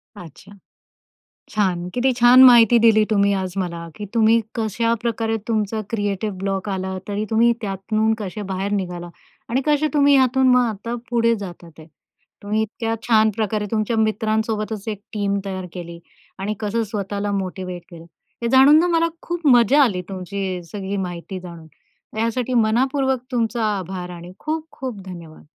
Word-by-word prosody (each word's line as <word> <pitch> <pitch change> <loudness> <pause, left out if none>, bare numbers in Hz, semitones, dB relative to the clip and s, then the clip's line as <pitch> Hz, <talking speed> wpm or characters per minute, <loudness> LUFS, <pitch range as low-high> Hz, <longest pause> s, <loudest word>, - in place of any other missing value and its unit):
अच्छा. 180 +1 -13 1.0
छान, 185 -5 0
किती 255 +1 +2
छान! 245 +2 +7
माहिती 240 -2 +7
दिली 220 -2 +5
तुम्ही 200 -1 +3
आज 185 -2 -3
मला, 170 -2 -4
की 210 - -6
तुम्ही 225 0 +4 0.2
कशाप्रकारे 225 0 -1
तुमचा 215 -1 -1
क्रिएटिव 205 -1 -2
ब्लॉक 195 0 -2
आला 190 -1 -3
तरी 205 +1 -2
तुम्ही 230 +1 +4
त्यातून 215 +2 0
कसे 210 0 -5
बाहेर 195 +2 -2
निघाला. 180 -3 -3 0.4
आणि 250 +3 0
कसे 300 0 +2
तुम्ही 285 -1 +5
यातून 260 0 +4
मग 250 0 +5
आता 225 +2 -5 0.2
पुढे 230 -1 +3
जातात 175 -4 -9
ते. 155 - -12 0.6
तुम्ही 210 +2 0
इतक्या 225 +1 -3
छान 220 -1 +5
प्रकारे 215 -1 -1
तुमच्या 220 +1 0
मित्रांसोबतच 220 -1 -1
एक 210 -2 -4
टीम 200 -1 -1
तयार 190 -2 -5
केली. 170 -2 -8 0.4
आणि 200 +2 -2
कसं 220 +2 -1
स्वतःला 205 0 -3
मोटिवेट 185 -2 -4
केलं, 165 -2 -11 0.4
हे 235 - 0
जाणून 270 +4 +7
ना 345 - +3
मला 335 -1 +2
खूप 345 -2 -4
मजा 250 +2 +6
आली, 200 -9 +1
तुमची 190 -1 -4
सगळी 200 -1 -4
माहिती 180 0 -5
जाणून, 170 -3 -10 0.5
यासाठी 230 +3 -1
मनापूर्वक 260 +3 +2
तुमचा 230 -1 0
आभार, 180 -1 -6
आणि 175 0 -9
खूप-खूप 305 -7 -5
धन्यवाद! 170 -4 -10
215 Hz, 150 wpm, -21 LUFS, 190-235 Hz, 1.0 s, छान